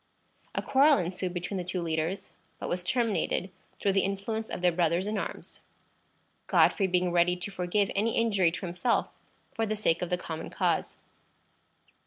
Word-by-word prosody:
A - - -1
quarrel 280 +2 +5
ensued 180 +1 -2
between 180 +2 -3
the - - -2
two 180 +1 -2
leaders, 165 +2 -2 0.3
but - - -5
was 180 0 -2
terminated 210 -3 0 0.3
through 200 - +2
the 195 - +3
influence 210 +3 -3
of - - -5
their 180 0 +4
brothers 170 +1 +1
in 210 +1 -2
arms, 200 - -5 0.9
Godfrey 195 - +4
being 180 -1 +1
ready 175 +1 +3
to 180 +3 -5
forgive 190 +2 0
any 220 +3 +1
injury 200 -7 +3
to 180 +3 -5
himself 180 +7 0 0.4
for 225 0 -1
the 215 - -1
sake 170 -6 +1
of 180 - -2
the 180 - +1
common 160 -2 -6
cause. - - 0
185 Hz, 170 wpm, -29 LUFS, 175-210 Hz, 0.9 s, quarrel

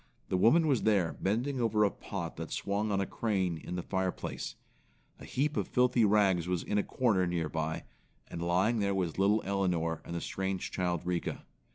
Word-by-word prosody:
The 95 - +1
woman 155 - +5
was 140 -6 +2
there 100 -6 +2
bending 125 +7 0
over 110 -2 +3
a 100 - +3
pot 85 -5 -6
that 80 0 -6
swung 105 +2 -1
on 100 - +1
a 95 - +1
crane 95 -8 -1
in 90 - -6
the 90 - -3
fireplace. 95 -10 -3 0.6
A - - -10
heap 150 +3 -1
of - - -1
filthy 125 -2 +3
rags 100 -5 +3
was 90 -2 -1
in 105 - 0
a - - +1
corner 105 -8 +1
near 85 -3 -1
by, 80 0 -2 0.4
and 85 - -6
lying 95 +7 +2
there 100 -1 +1
was 90 -2 -1
little 105 +2 +3
Elinor 90 -4 0
and 85 - -6
the 85 - -2
strange 95 -1 -3
child 90 -2 -1
Rika. 90 -1 -2
95 Hz, 195 wpm, -31 LUFS, 85-105 Hz, 0.6 s, woman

